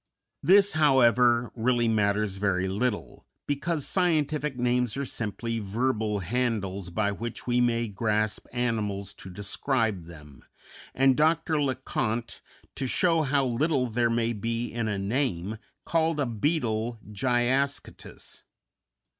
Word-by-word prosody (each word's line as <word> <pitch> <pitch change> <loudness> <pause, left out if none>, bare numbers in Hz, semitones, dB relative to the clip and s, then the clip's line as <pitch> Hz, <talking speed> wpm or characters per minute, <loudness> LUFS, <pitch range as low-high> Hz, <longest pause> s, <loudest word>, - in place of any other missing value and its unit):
This, 200 +2 +5
however, 125 -5 +4
really 120 0 +1
matters 105 -2 +1
very 95 -2 0
little, 105 +4 -3 0.2
because 145 +1 -2
scientific 150 -6 0
names 125 -1 0
are 140 - -2
simply 115 0 -3
verbal 110 0 -1
handles 100 -3 -2
by 100 +3 0
which 115 +3 -6
we 125 0 +2
may 120 -1 +1
grasp 105 0 -1
animals 105 -5 -2
to 95 - -11
describe 105 - -1
them, 75 -5 -13 0.5
and 135 0 +4
Dr. 160 +1 +2
Le 135 -2 +1
Conte, 120 -2 -3 0.3
to 135 - -3
show 165 +4 +2
how 140 -2 +1
little 130 +2 +1
there 120 0 +1
may 115 0 0
be 115 +2 -3
in 115 -2 -2
a 105 -2 -1
name, 105 -2 -1 0.3
called 165 -1 +1
a 145 - +2
beetle 115 -2 -1
Gyascutus. 125 +5 -2
120 Hz, 125 wpm, -27 LUFS, 105-135 Hz, 0.5 s, This